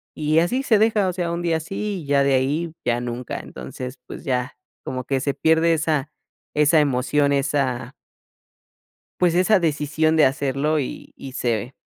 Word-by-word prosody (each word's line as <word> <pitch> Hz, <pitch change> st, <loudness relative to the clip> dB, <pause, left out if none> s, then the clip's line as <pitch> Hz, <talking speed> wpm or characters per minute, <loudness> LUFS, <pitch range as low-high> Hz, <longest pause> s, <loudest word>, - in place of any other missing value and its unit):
y 155 Hz, +1 st, +2 dB
así 245 Hz, +11 st, +1 dB
se 225 Hz, -6 st, +3 dB
deja, 215 Hz, -3 st, +3 dB
o -, -, -3 dB
sea, 175 Hz, -2 st, -2 dB
un 170 Hz, -, -2 dB
día 165 Hz, -2 st, +1 dB
así 195 Hz, +4 st, -4 dB
y -, -, -10 dB
ya 140 Hz, 0 st, +3 dB
de 140 Hz, -1 st, +2 dB
ahí 150 Hz, +6 st, 0 dB
ya 120 Hz, 0 st, +1 dB
nunca, 120 Hz, 0 st, -4 dB
entonces, 125 Hz, -, -8 dB
pues -, -, -9 dB
ya, 125 Hz, -3 st, -2 dB, 0.3 s
como 130 Hz, 0 st, -4 dB
que 135 Hz, -1 st, 0 dB
se 140 Hz, +1 st, -1 dB
pierde 160 Hz, +1 st, +3 dB
esa 155 Hz, -2 st, 0 dB, 0.5 s
esa 150 Hz, +2 st, +4 dB
emoción, 140 Hz, +1 st, +2 dB
esa 135 Hz, -3 st, -1 dB, 1.3 s
pues, 175 Hz, -1 st, +3 dB
esa 185 Hz, +3 st, +4 dB
decisión 155 Hz, 0 st, +1 dB
de 155 Hz, -, +6 dB
hacerlo 140 Hz, +2 st, 0 dB
y 135 Hz, -, -6 dB
y 135 Hz, -1 st, -9 dB
se 120 Hz, 0 st, -2 dB
150 Hz, 170 wpm, -22 LUFS, 130-165 Hz, 1.3 s, de